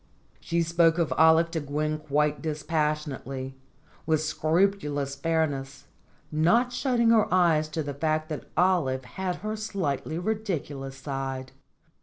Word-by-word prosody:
She 170 0 0
spoke 165 0 +3
of 170 -3 +1
Olive 160 +1 +5
to 165 - -1
Gwen 150 +1 -2
quite 150 0 0
dispassionately, 150 -4 -2 0.5
with 160 -1 +3
scrupulous 155 -3 0
fairness, 140 -2 -2 0.5
not 200 +11 +3
shutting 245 -2 +2
her 220 -2 +3
eyes 165 -4 +3
to 155 0 -2
the 145 0 -4
fact 155 +2 -1
that 155 - -6
Olive 155 -9 +2
had 185 +7 -3
her 215 +4 -4
slightly 190 -8 -3
ridiculous 170 -10 -3
side. 135 -1 -4
155 Hz, 125 wpm, -27 LUFS, 145-175 Hz, 0.5 s, Olive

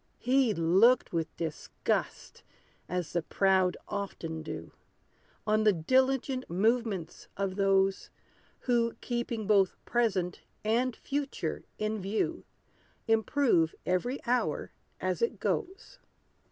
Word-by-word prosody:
He 255 -1 +3
looked 190 +11 +4
with 165 -1 -2
disgust, 160 -2 -3 0.5
as 180 -2 -3
the 175 - +1
proud 190 +2 +2
often 165 -5 -4
do, 155 0 -7 0.7
On 215 0 +2
the 210 -1 +5
diligent 260 - +1
movements 200 -2 0
of 195 -1 -1
those, 195 -1 +2 0.5
Who, 235 -2 +1
keeping 240 -2 -3
both 195 -3 +3
present 195 -7 0 0.2
and 235 +3 +1
future 280 0 -3
in 215 0 -2
view, 200 +3 -1 0.6
Improve 225 - +3
every 210 +9 0
hour 245 +1 0 0.3
as - - -1
it 465 - 0
goes. 395 +7 -3
215 Hz, 105 wpm, -30 LUFS, 185-245 Hz, 0.7 s, the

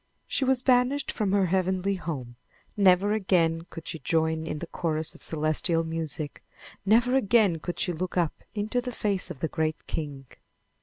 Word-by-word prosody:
She - - 0
was 260 -1 +2
banished 255 +2 +3
from 210 -4 -1
her 200 -1 +3
heavenly 185 +1 +1
home. 140 -10 -5 0.4
Never 195 0 +4
again 170 -5 +1
could 165 -1 -9
she 160 - -4
join 160 +2 0
in 155 - -3
the 170 - -5
chorus 160 -2 -2
of - - -16
celestial 160 +2 +1
music. 160 -2 -4 0.4
Never 235 +4 +4
again 210 -8 +3
could 175 +3 -5
she 190 - +1
look 180 +3 -4
up 170 -3 0
into 215 +4 0
the 250 0 -4
face 205 -5 -1
of 130 - -8
the 160 - +1
great 155 0 -2
King. 145 -4 -5
180 Hz, 170 wpm, -27 LUFS, 160-210 Hz, 0.4 s, Never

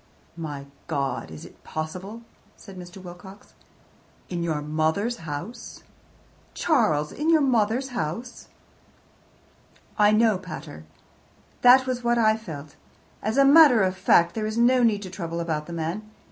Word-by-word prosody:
"My 150 -4 -6 0.2
God, 140 - -2
is 80 -1 -10
it - - -17
possible?" 185 +8 -6 0.3
said 195 -3 -13
Mr. 180 +1 -10
Wilcox. 185 +2 -12 0.8
"In 175 -1 -3
your 160 -3 -1
mother's 160 +10 -1
house! 185 +12 -7 0.7
Charles, 160 - +1
in 305 +3 -2
your 325 -1 +5
mother's 250 -1 +1
house!" 240 +2 -5 1.5
"I 210 0 +6
know, 215 -2 +3
pater. 155 - -9 0.8
That 255 +1 +7
was 250 -1 -3
what 240 0 +2
I 220 -2 +4
felt. 155 -9 -9 0.5
As 220 +4 -2
a 275 - +6
matter 280 -6 +7
of 185 0 0
fact, 170 -2 +3
there 215 -1 -2
is 215 +1 -4
no 250 +2 +4
need 215 -4 +2
to 185 - -8
trouble 170 -3 -5
about 155 -3 -3
the 170 - -7
man. 170 +6 -4
195 Hz, 145 wpm, -25 LUFS, 160-235 Hz, 1.5 s, That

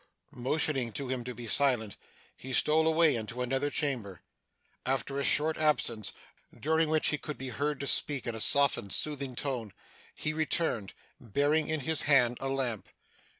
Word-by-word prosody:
Motioning 130 -1 -1
to 135 +1 -4
him 130 -2 -3
to 125 -1 -6
be 120 - -8
silent, 115 -3 +2 0.4
he 130 0 -8
stole 160 +4 +3
away 160 -2 +4
into 115 +2 -4
another 135 +3 -1
chamber. 120 - -3 0.6
After 135 +1 -2
a - - -1
short 155 +3 +3
absence 135 -8 0 0.5
(during 160 +1 +1
which 155 0 +2
he 150 - -1
could 150 - -6
be 135 0 -5
heard 145 +2 -3
to - - -3
speak 140 0 +1
in 120 - -3
a 110 - -5
softened 140 -8 +4
soothing 140 -4 0
tone) 120 -6 -3 0.4
he 155 - -2
returned, 155 - -2 0.2
bearing 145 +6 0
in 155 -1 -1
his 160 +3 +2
hand 125 -4 +4
a 135 - -2
lamp. 130 -6 -2
135 Hz, 165 wpm, -29 LUFS, 120-150 Hz, 0.6 s, away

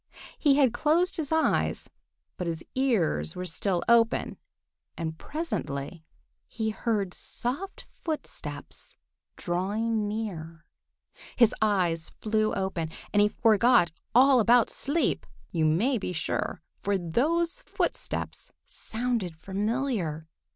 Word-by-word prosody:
He 285 -3 +5
had 270 -5 +4
closed 340 +8 +2
his 315 -3 -3
eyes, 320 0 +1 0.5
but 180 - -4
his 165 -1 -3
ears 190 - +1
were 180 - -4
still 180 +1 -1
open, 230 -1 +3 0.6
and 160 -1 -3
presently 175 - -4 0.4
he 220 -1 -2
heard 205 -3 -1
soft 315 +12 -4 0.2
footsteps 315 -2 -6 0.4
drawing 210 +5 -1
near. 170 -6 -5 0.7
His 235 -3 +5
eyes 180 -6 +1
flew 215 0 +1
open, 190 -4 -2 0.2
and 205 - +5
he 205 - +6
forgot 225 -4 +4 0.2
all 260 +1 +7
about 235 +1 +5
sleep, 300 +4 0 0.2
you 160 -3 +1
may 215 - +2
be 180 - -3
sure, 160 0 -2 0.2
for 200 0 +1
those 330 - 0
footsteps - - -3
sounded 225 -8 -3
familiar. 195 - -2
215 Hz, 110 wpm, -28 LUFS, 175-250 Hz, 0.7 s, all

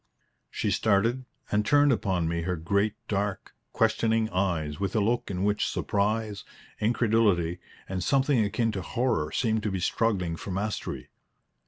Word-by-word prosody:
She - - -1
started, 115 +5 +2 0.3
and 105 0 +2
turned 145 +4 +4
upon 95 -8 0
me 85 0 -1
her 90 +2 -1
great 100 +6 0
dark, 100 -1 -2 0.2
questioning 110 -1 +1
eyes 85 -6 -1
with 100 0 -2
a - - +4
look 115 +4 0
in 95 -1 -2
which 105 0 +1
surprise, 105 0 -1 0.4
incredulity, 105 -6 +2 0.3
and 95 -1 -3
something 135 -2 +3
akin 115 +3 0
to 100 -3 -4
horror 90 -7 -1
seemed 110 -3 +1
to 105 - -1
be 95 -1 -2
struggling 90 -3 0
for - - -8
mastery. 100 +3 -3
105 Hz, 150 wpm, -27 LUFS, 90-115 Hz, 0.4 s, turned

